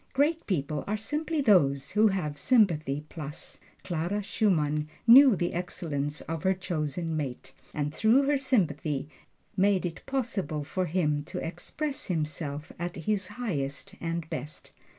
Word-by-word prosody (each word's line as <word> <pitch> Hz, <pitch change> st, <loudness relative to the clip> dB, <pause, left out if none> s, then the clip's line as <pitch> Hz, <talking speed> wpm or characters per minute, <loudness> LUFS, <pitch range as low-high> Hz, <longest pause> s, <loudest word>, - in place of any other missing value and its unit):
Great 305 Hz, +4 st, +1 dB
people 150 Hz, -5 st, -1 dB
are 210 Hz, +2 st, 0 dB
simply 300 Hz, +7 st, -1 dB
those 140 Hz, -, +3 dB
who 215 Hz, +1 st, +5 dB
have 180 Hz, -7 st, -1 dB
sympathy 155 Hz, -, +2 dB
plus. 150 Hz, -2 st, -7 dB, 0.2 s
Clara 175 Hz, +4 st, -2 dB
Schumann 155 Hz, -7 st, +1 dB, 0.2 s
knew 255 Hz, 0 st, +9 dB
the 175 Hz, -1 st, -1 dB
excellence 150 Hz, -4 st, -3 dB
of 165 Hz, -1 st, -4 dB
her 190 Hz, +3 st, +2 dB
chosen 165 Hz, -2 st, -2 dB
mate, 135 Hz, -3 st, -4 dB, 0.2 s
and 145 Hz, 0 st, -2 dB
through 225 Hz, -, +4 dB
her 280 Hz, 0 st, +2 dB
sympathy 160 Hz, -, 0 dB, 0.5 s
made 195 Hz, -1 st, +3 dB
it 170 Hz, -2 st, -5 dB
possible 205 Hz, -, -2 dB
for 185 Hz, +5 st, -2 dB
him 150 Hz, -3 st, +1 dB
to -, -, -7 dB
express 270 Hz, -, -4 dB
himself 155 Hz, -3 st, -3 dB
at 175 Hz, 0 st, -3 dB
his 195 Hz, +3 st, -1 dB
highest 195 Hz, -, -4 dB
and 165 Hz, -1 st, -3 dB
best. 150 Hz, +4 st, -6 dB
175 Hz, 140 wpm, -28 LUFS, 150-210 Hz, 0.5 s, knew